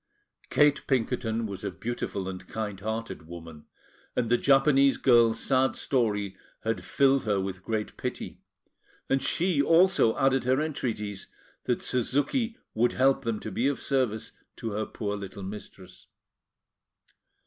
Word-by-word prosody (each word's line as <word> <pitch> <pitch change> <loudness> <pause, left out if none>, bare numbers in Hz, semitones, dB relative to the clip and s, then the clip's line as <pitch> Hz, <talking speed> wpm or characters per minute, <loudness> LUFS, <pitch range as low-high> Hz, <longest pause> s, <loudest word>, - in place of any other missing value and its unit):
Kate 145 -1 +3
Pinkerton 115 -3 0
was 100 -1 -6
a 100 - -1
beautiful 105 -5 -4
and 95 -1 -7
kind 105 -3 -4
hearted 110 -5 -5
woman, 80 -3 -10 0.5
and 120 -2 0
the 120 - +5
Japanese 135 0 +4
girl's 115 -3 +4
sad 130 +1 +2
story 105 -7 0 0.3
had 115 0 -1
filled 135 -1 +2
her 105 -2 +1
with 95 -1 -4
great 110 0 -3
pity; - - -5 0.7
and 135 0 +3
she 165 +3 +1
also 165 -6 +4
added 135 -1 +3
her 130 +2 +3
entreaties 110 -10 -3 0.4
that 125 -2 0
Suzuki 145 - 0 0.2
would 120 +2 +2
help 135 +1 +3
them 115 -2 -1
to 110 - -6
be 120 +7 +1
of 140 -2 -1
service 130 -6 -1 0.2
to 115 - -5
her 105 +1 -2
poor 105 -2 -3
little 100 -1 -7
mistress. 95 -2 -10
115 Hz, 140 wpm, -28 LUFS, 105-135 Hz, 0.7 s, the